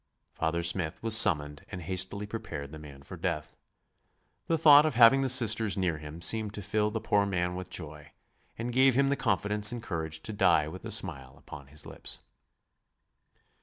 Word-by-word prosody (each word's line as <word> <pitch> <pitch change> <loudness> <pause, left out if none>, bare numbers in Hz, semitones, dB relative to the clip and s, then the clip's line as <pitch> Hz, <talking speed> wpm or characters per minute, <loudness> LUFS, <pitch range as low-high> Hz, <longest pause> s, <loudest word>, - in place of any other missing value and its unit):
Father 85 +1 -2
Smith 85 0 -3
was 115 -1 +2
summoned 75 -9 +3
and 90 - -7
hastily 95 +4 -3
prepared 75 -10 -7
the 80 - -10
man 70 -2 -13
for - - -10
death. 75 - -4 0.9
The 165 - +1
thought 150 -2 +7
of 155 -5 -1
having 120 +3 +6
the 135 - 0
Sisters 115 -5 +2
near 85 -5 -1
him 75 +3 -9
seemed 110 +2 +1
to 105 - -6
fill 105 +2 0
the 110 +1 -4
poor 105 -1 +1
man 90 -2 -2
with 90 0 -7
joy 75 -3 -8 0.5
and 120 +2 -4
gave 130 0 +4
him 135 +1 +2
the 140 - +1
confidence 105 -1 +2
and 120 -1 -6
courage 80 -5 -5
to 110 - -6
die 90 -7 +2
with 95 +4 -9
a - - -6
smile 75 -12 -2
upon 70 -2 -12
his 75 +2 -7
lips. - - -6
95 Hz, 185 wpm, -28 LUFS, 80-110 Hz, 0.9 s, thought